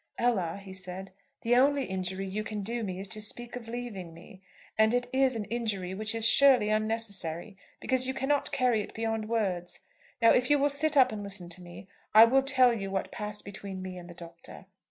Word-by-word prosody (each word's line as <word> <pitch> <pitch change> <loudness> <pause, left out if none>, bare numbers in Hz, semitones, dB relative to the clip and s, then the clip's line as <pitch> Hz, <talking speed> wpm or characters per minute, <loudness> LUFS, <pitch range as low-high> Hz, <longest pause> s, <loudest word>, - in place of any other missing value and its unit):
"Ella," 200 -7 0
he 195 -1 -11
said, 190 0 -6 0.3
"the 235 +1 +3
only 275 +2 +3
injury 190 0 -3
you 200 +3 -4
can 215 -2 -5
do 235 +4 -3
me 190 -4 -4
is 195 +1 -5
to 215 -1 -3
speak 240 +3 -2
of 240 -2 -8
leaving 220 -8 -6
me. 185 +3 -15 0.3
And 220 +2 +3
it 245 0 0
is 265 -1 +2
an 215 -2 -3
injury 205 -6 -3
which 215 +3 -3
is 225 0 +5
surely 260 -7 +6
unnecessary 215 -4 -2 0.2
because 260 -1 +1
you 260 - -1
cannot 270 +2 0
carry 250 -4 +2
it - - -9
beyond 225 -1 -2
words. 190 -6 -2 0.4
Now, 230 -1 +6
if 250 0 +2
you 290 - +5
will 285 +1 +2
sit 295 +2 +1
up 255 -2 +6
and 215 -1 -5
listen 195 -3 -5
to 175 +1 -9
me, 175 +2 -12 0.3
I 220 +1 +11
will 265 +4 +3
tell 260 -2 +4
you 195 -4 -4
what 190 0 -3
passed 210 -1 -6
between 195 -1 -7
me 185 -1 -6
and 175 0 -12
the 175 - -11
Doctor." 170 +1 -12
215 Hz, 215 wpm, -29 LUFS, 190-245 Hz, 0.4 s, I